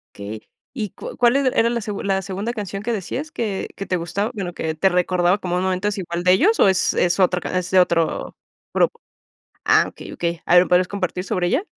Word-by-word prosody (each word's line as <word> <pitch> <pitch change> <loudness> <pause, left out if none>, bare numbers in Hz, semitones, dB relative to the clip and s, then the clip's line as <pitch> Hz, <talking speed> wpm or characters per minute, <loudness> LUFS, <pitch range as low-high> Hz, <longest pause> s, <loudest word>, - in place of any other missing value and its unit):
Okey. 105 +2 -7 0.3
¿Y 215 -6 -3
cua - - -9
cual 245 +2 +4
er 270 -2 +2
era 230 +1 +4
la 235 0 -1
segun 205 -1 -5
la 195 -1 +1
segunda 195 +4 -4
canción 200 -3 -5
que 235 +2 -2
decías 255 - -4
que 210 -9 -3
que 195 - -5
te 180 - 0
gustaba?, 195 +6 -2
bueno, 190 -5 -4
que 160 -2 -3
te 190 +5 +3
recordaba 180 +1 +2
como 180 -3 -2
un 180 - 0
momento 185 +2 0
es 210 - -2
igual 170 -1 -3
de 180 0 +5
ellos 380 - +3
o - - +6
¿es 190 - +2
es 175 +2 +1
otra 180 -1 +3
ca 185 - -4
es 180 -1 -4
de 190 - +4
otro 165 -2 0 0.4
grupo? - - +1 0.7
Ah, - - +5
okey, - - -10
okey. 170 -1 -3
A 175 - +5
ver, 175 - +8
¿me - - -8
podrías 180 0 +4
compartir 185 -2 -3
sobre 180 -1 -1
ella? 270 - +1
185 Hz, 240 wpm, -21 LUFS, 180-210 Hz, 0.7 s, ver